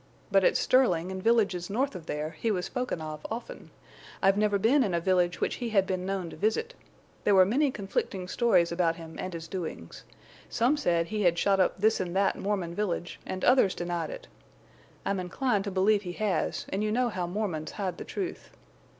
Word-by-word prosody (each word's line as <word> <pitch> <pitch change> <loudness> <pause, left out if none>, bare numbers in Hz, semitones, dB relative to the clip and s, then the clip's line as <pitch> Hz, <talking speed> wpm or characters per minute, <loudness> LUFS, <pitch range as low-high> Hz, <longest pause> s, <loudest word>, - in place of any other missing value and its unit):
But 195 -1 +4
at - - +4
Sterling 190 -9 +2
and 190 0 -5
villages 200 -5 +2
north 260 +7 0
of 165 -3 -9
there 150 +1 -3
he 230 - -2
was 185 -4 0
spoken 250 -10 -3
of 155 -1 -6
often. 230 +2 -7 0.5
I've 195 0 +4
never 205 -1 +2
been 255 +8 +4
in 190 -6 0
a - - +2
village 180 0 +1
which - - -1
he 240 -2 -3
had 195 -3 +3
been 185 -1 -2
known 190 -4 -3
to - - -9
visit. 340 - 0 0.5
There 205 - +4
were 185 -1 +7
many 275 +9 +2
conflicting 195 -4 -3
stories 185 -6 +3
about 170 -1 +1
him 165 -1 -10
and 185 - -4
his 165 -1 -7
doings. 165 - -6 0.5
Some 245 +6 +2
said 170 - 0
he 215 -1 -2
had 175 -3 +3
shot 195 +2 +2
up 185 - +2
this 220 +3 +2
and 180 -1 -3
that 195 0 +2
Mormon 190 -4 -2
village, 175 -3 -3
and 185 - -3
others 250 -7 +4
denied 175 -1 -3
it. - - -8 0.8
I'm 200 -1 0
inclined 205 +3 -1
to - - -2
believe 200 +2 +3
he 180 -3 -6
has, 210 0 -1
and 200 +2 -1
you 215 - 0
know 245 +2 +2
how 185 -5 -3
Mormons 180 -5 -3
hide 185 -4 -3
the - - -4
truth. 380 -2 -5
195 Hz, 205 wpm, -28 LUFS, 175-220 Hz, 0.8 s, were